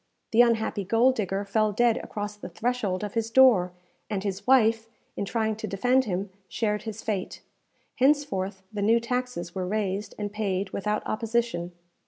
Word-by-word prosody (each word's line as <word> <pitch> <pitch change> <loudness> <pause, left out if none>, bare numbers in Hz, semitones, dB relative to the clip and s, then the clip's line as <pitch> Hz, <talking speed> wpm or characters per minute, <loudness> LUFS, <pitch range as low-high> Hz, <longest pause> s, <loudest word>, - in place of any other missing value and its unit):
The 230 - +6
unhappy 225 -3 +2
gold 230 +7 +3
digger 200 -3 -2
fell 215 +1 +1
dead 235 +2 +3
across 205 0 -5
the 210 - -9
threshold 220 -6 -1
of 205 - -4
his 225 -1 -1
door, 225 -8 +5 0.4
and 200 -3 -2
his 200 +1 -4
wife, 225 -3 +4 0.3
in - - -2
trying 220 +1 -1
to 220 - -5
defend 245 +7 +2
him, 190 -1 -3 0.2
shared 210 -2 -1
his 220 -1 -7
fate. 205 -4 -3 0.5
Henceforth, 215 -9 +1
the 205 - -3
new 225 +3 +4
taxes 250 -6 -3
were 185 -2 -3
raised 205 0 -2
and 205 -1 -4
paid 200 -2 -2
without 210 +1 -1
opposition. 225 -6 -1
215 Hz, 165 wpm, -26 LUFS, 195-235 Hz, 0.5 s, The